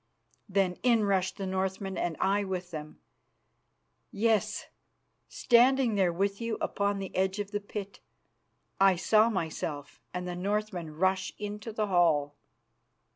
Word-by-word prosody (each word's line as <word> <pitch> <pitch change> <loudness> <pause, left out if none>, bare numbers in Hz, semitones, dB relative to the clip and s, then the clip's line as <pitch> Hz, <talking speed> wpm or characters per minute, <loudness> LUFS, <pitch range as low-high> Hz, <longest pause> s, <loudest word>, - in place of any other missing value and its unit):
Then 190 -2 +1
in 235 -3 +3
rushed 190 -2 +1
the 195 - -4
Northmen 190 +1 -2
and 170 -2 -2
I 200 +2 +2
with 185 -2 -4
them. 155 -1 -7 1.1
Yes, 220 0 +1 0.6
standing 245 0 +4
there 190 -4 +2
with 195 +4 -1
you 230 -1 -2
upon 200 0 0
the 195 -1 -6
edge 190 +1 +1
of 205 -1 -4
the 205 - -1
pit, 200 -1 -7 0.8
I 195 -1 +6
saw 215 +5 +4
myself 160 -6 -4
and 180 0 -4
the 175 - -4
Northmen 190 -4 -2
rush 190 +2 +1
into 210 +2 -5
the 215 0 -1
hall." 165 -7 +2
195 Hz, 135 wpm, -29 LUFS, 180-210 Hz, 1.1 s, I